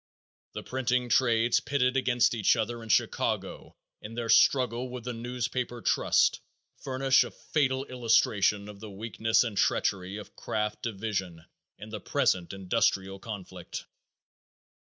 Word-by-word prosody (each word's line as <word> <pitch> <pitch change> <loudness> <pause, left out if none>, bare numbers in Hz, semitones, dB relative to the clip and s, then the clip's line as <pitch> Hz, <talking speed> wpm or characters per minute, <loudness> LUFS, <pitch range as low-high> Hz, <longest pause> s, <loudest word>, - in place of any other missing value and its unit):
The - - -6
printing 125 -1 -1
trades 120 -2 +3
pitted 125 -2 0
against 125 -3 +2
each 110 -1 +3
other 115 +1 -3
in 115 - -10
Chicago - - -1 0.3
in 110 +2 -9
their 115 -1 -3
struggle 125 +1 +3
with 125 -1 -7
the 125 +1 -4
newspaper 120 +1 -3
trust - - +2 0.4
furnish 135 0 +3
a - - -7
fatal 135 -3 -1
illustration 105 -5 +2
of 105 -1 -10
the 110 +1 -9
weakness 110 +3 +1
and 115 -4 -4
treachery 95 0 0
of 105 - -11
craft 105 0 -3
division 95 -6 -4 0.3
in 105 - -10
the 105 - -5
present 90 -1 0
industrial 95 0 0
conflict. 105 -3 -8
115 Hz, 130 wpm, -28 LUFS, 105-125 Hz, 0.4 s, trades